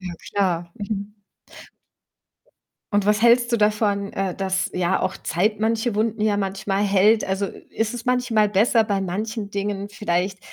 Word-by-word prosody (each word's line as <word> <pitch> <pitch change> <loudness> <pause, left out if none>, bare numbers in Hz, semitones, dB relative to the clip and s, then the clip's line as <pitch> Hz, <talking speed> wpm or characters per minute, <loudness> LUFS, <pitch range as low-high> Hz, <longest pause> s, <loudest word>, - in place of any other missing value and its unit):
Ja 180 -2 -6 0.2
klar. 175 -4 -1
Mhm. 205 0 -4 1.8
Und 205 -1 +2
was 210 +1 +2
hältst 235 +1 +4
du 235 - +4
davon, 210 -1 +1
äh, 195 -2 -2
dass 190 -1 -1
ja 180 +1 0
auch 185 0 -2
Zeit 210 +5 0
manche 225 +1 0
Wunden 220 +1 -1
ja 210 -1 +2
manchmal 195 0 -1
heilt? 205 +3 +4
Also, 195 +1 -1
ist 225 +3 -4
es 240 0 -7
manchmal 245 -4 +2
besser, 220 +3 +3
bei 200 -2 -1
manchen 205 +3 -4
Dingen 200 0 -3
vielleicht, 190 -2 -2
205 Hz, 155 wpm, -22 LUFS, 195-220 Hz, 1.8 s, hältst